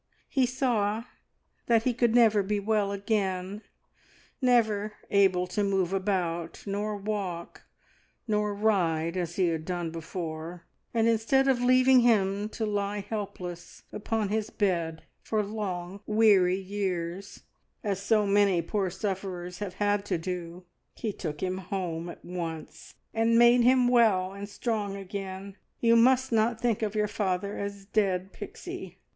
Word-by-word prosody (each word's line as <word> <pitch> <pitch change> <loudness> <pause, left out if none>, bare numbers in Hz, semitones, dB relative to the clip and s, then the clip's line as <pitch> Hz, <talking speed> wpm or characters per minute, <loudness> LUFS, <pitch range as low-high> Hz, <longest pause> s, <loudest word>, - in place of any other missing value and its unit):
He 260 -2 +2
saw 230 -4 0 0.6
that 230 -2 +4
he 250 - +1
could 235 -1 +2
never 220 -4 +5
be 205 +1 -1
well 205 -1 +1
again 200 -1 -2 0.8
never 220 -4 +2 0.2
able 190 -3 +4
to 195 +3 -1
move 195 -2 +1
about, 180 -4 -2
nor 205 +1 -2
walk, 195 -4 -4 0.6
nor 210 -1 +1
ride, 175 -6 +1
as 175 -2 -3
he 185 -3 +2
had 160 -1 -2
done 175 -1 -3
before, 165 0 -6 0.3
and 230 -1 +2
instead 230 +4 +3
of 260 -2 +2
leaving 255 +1 +6
him 205 -3 +2
to 220 - -3
lie 205 -1 -1
helpless 180 -5 -6
upon 215 -1 -1
his 215 +1 -1
bed 170 -5 -1 0.2
for 215 -1 0
long 195 -3 -4
weary 205 -4 +4
years, 190 -1 -4 0.4
as 200 -3 -1
so 210 +1 +2
many 200 -2 +3
poor 195 +2 -1
sufferers 185 -2 -4
have 195 -3 -5
had 205 0 +1
to 185 -3 0
do, 175 +1 -5 0.3
He 220 -3 -3
took 150 -6 -5
him 185 0 -1
home 175 -3 -4
at - - -11
once, 165 -3 -6 0.2
and 225 +1 +3
made 240 +1 +6
him 250 +1 +5
well 215 -6 +3
and 200 +1 -7
strong 210 -2 -2
again. 195 0 -6 0.2
You 230 0 +4
must 255 +2 +4
not 225 0 +2
think 230 -3 0
of 215 -1 -2
your 210 0 +2
father 200 -1 -2
as 200 -1 -5
dead, 195 -2 0
Pixie. - - -8
200 Hz, 145 wpm, -28 LUFS, 180-220 Hz, 0.8 s, leaving